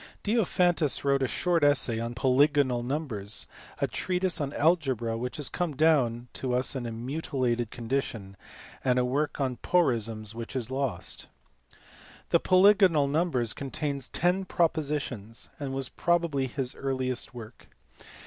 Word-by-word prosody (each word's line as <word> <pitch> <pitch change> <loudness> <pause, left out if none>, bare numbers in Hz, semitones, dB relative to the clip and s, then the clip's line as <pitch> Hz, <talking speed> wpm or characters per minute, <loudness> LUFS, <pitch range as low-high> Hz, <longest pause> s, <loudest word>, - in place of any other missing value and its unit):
Diophantus 180 - +2
wrote 140 -1 +3
a 130 - +2
short 170 +7 0
essay 130 -5 +3
on 115 +1 -4
polygonal 130 0 +3
numbers; 120 -6 -3 0.3
a - - +2
treatise 180 -2 -1
on 140 -1 -2
algebra 135 -8 +1
which 125 +2 -4
has 150 - -2
come 175 -5 -2
down 130 -6 +2
to 125 -2 -2
us 125 +2 +1
in 125 -3 -3
a - - -4
mutilated 125 -1 -2
condition; 115 -5 -3 0.5
and 125 -1 +2
a 125 - +3
work 145 +5 -1
on 130 -3 -1
porisms 115 -10 0
which 115 +3 -7
is 125 -1 -3
lost. 135 -1 -2 1.0
The - - +4
Polygonal 185 -5 +5
Numbers 140 -7 0
contains 140 -1 -3
ten 180 +3 +1
propositions, 145 - -2
and 140 -2 -4
was 135 -1 -2
probably 170 -6 +1
his 130 0 -3
earliest 130 -2 -3
work. 115 0 -11
135 Hz, 140 wpm, -28 LUFS, 120-155 Hz, 1.0 s, Polygonal